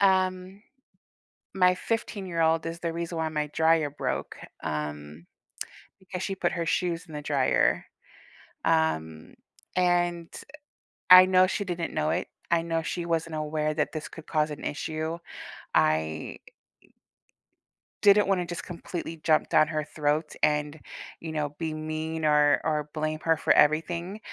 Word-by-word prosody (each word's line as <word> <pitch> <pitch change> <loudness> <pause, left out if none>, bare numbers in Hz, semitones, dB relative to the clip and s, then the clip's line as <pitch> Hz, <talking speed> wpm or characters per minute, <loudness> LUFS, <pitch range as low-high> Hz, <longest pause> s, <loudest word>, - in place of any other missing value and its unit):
um, 185 0 +1 0.9
my 180 -1 +4
fifteen-year-old 175 -7 -1
is 165 +1 -5
the 170 -1 -3
reason 170 0 -4
why 160 -1 -1
my 150 -1 -2
dryer 160 -2 +3
broke, 145 - -4 0.3
um, 75 +1 -5 0.7
because 185 -1 -6
she 195 - -2
put - - 0
her 170 -1 -2
shoes 170 0 -1
in 155 - -12
the 150 - -5
dryer. 140 -3 +2 0.8
Um, 80 0 0 0.4
and 175 -2 +1
eh, 305 - -11 0.5
I 185 0 +11
know 185 0 +5
she 200 - -2
didn't 175 -2 -3
know 75 - 0
it, - - -1 0.2
I 170 -1 +4
know 165 -1 -1
she 175 +1 -3
wasn't 165 -1 -1
aware 155 0 -1
that 150 - 0
this 155 -1 -5
could 160 - -12
cause 155 -1 +1
an 145 - -7
issue. 155 +2 -3 0.6
I 80 0 +1 1.6
didn't 205 0 +6
wanna 185 -3 +1
just 175 0 -6
completely 170 -2 -6
jump 155 -1 +3
down 155 - +5
her 155 -2 -2
throat 150 +1 0
and, 150 0 +1 0.4
you 160 -1 -5
know, 150 -1 -2
be 160 -2 -2
mean 155 +1 -4
or 150 -1 +4
or 150 -1 -1
blame 155 0 -2
her 165 -1 +3
for - - +3
everything, 170 +6 +2
160 Hz, 145 wpm, -27 LUFS, 150-175 Hz, 1.6 s, I